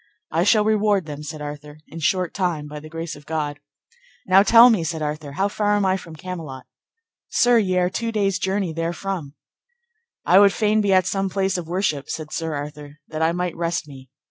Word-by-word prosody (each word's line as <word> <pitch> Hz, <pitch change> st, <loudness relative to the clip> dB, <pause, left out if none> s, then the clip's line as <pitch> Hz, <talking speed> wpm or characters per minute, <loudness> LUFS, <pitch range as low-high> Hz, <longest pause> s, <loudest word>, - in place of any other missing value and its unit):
I 165 Hz, +2 st, +2 dB
shall 210 Hz, 0 st, +4 dB
reward 210 Hz, -4 st, +2 dB
them, 150 Hz, -1 st, -7 dB
said 150 Hz, 0 st, -7 dB
Arthur, 150 Hz, 0 st, -8 dB
in 165 Hz, -, -9 dB
short 180 Hz, +2 st, 0 dB
time, 175 Hz, -6 st, -2 dB
by 150 Hz, 0 st, -7 dB
the 155 Hz, +1 st, -12 dB
grace 165 Hz, 0 st, -5 dB
of 145 Hz, 0 st, -16 dB
God. 150 Hz, -2 st, -3 dB, 0.7 s
Now, 190 Hz, +1 st, +6 dB
tell 230 Hz, +4 st, +8 dB
me, 205 Hz, -7 st, +1 dB
said 160 Hz, -1 st, -3 dB
Arthur, 150 Hz, -1 st, -4 dB
how 195 Hz, +7 st, +1 dB
far 205 Hz, 0 st, 0 dB
am 205 Hz, -1 st, +1 dB
I 190 Hz, 0 st, +2 dB
from 170 Hz, -4 st, -8 dB
Camelot? 160 Hz, -6 st, -7 dB, 0.6 s
Sir, 245 Hz, -1 st, +4 dB
ye 185 Hz, -4 st, 0 dB
are 180 Hz, 0 st, +3 dB
two 230 Hz, +3 st, -2 dB
days' 200 Hz, -3 st, 0 dB
journey 190 Hz, -3 st, -1 dB
therefrom. 165 Hz, -2 st, -4 dB, 0.9 s
I 185 Hz, +3 st, +6 dB
would 200 Hz, -1 st, +6 dB
fain 215 Hz, 0 st, +2 dB
be 200 Hz, -1 st, +1 dB
at 185 Hz, -1 st, +4 dB
some 195 Hz, -1 st, -1 dB
place 190 Hz, 0 st, 0 dB
of 175 Hz, -3 st, -4 dB
worship, 170 Hz, -6 st, -1 dB
said 155 Hz, -1 st, -5 dB
Sir 160 Hz, -2 st, -3 dB
Arthur, 145 Hz, 0 st, -7 dB
that 155 Hz, 0 st, -4 dB
I 160 Hz, +1 st, +3 dB
might 180 Hz, 0 st, -2 dB
rest 170 Hz, -2 st, -2 dB
me. 135 Hz, -2 st, -13 dB
170 Hz, 205 wpm, -22 LUFS, 150-195 Hz, 0.9 s, tell